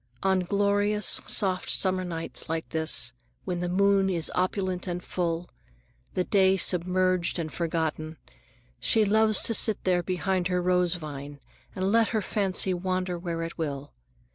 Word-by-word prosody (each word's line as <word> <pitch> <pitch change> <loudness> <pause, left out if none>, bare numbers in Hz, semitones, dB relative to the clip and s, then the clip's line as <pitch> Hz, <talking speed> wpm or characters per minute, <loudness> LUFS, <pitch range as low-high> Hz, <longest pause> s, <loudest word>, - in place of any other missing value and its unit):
On 190 -1 +2
glorious, 205 +2 +1
soft 185 -3 0
summer 185 -1 +2
nights 165 -2 -5
like 165 0 -3
this, 160 -6 +1 0.3
when 180 -2 -3
the 175 0 -2
moon 195 +1 +3
is 170 -4 +1
opulent 185 0 -1
and 175 0 -4
full, 170 -1 -3 0.7
the 185 - +1
day 190 0 +3
submerged 185 0 +2
and 160 -3 -4
forgotten, 160 -2 -3 0.6
she 220 -1 +3
loves 215 +1 +3
to 230 - +4
sit 220 -1 +3
there 180 -1 +2
behind 185 0 -1
her 180 -1 0
rose 180 0 +1
vine 145 -3 -8 0.4
and 190 +1 -1
let 225 0 +4
her 220 -2 -1
fancy 190 -2 0
wander 185 0 -2
where 170 -1 -4
it 165 +1 -7
will. 145 -3 -4
180 Hz, 150 wpm, -27 LUFS, 170-195 Hz, 0.7 s, to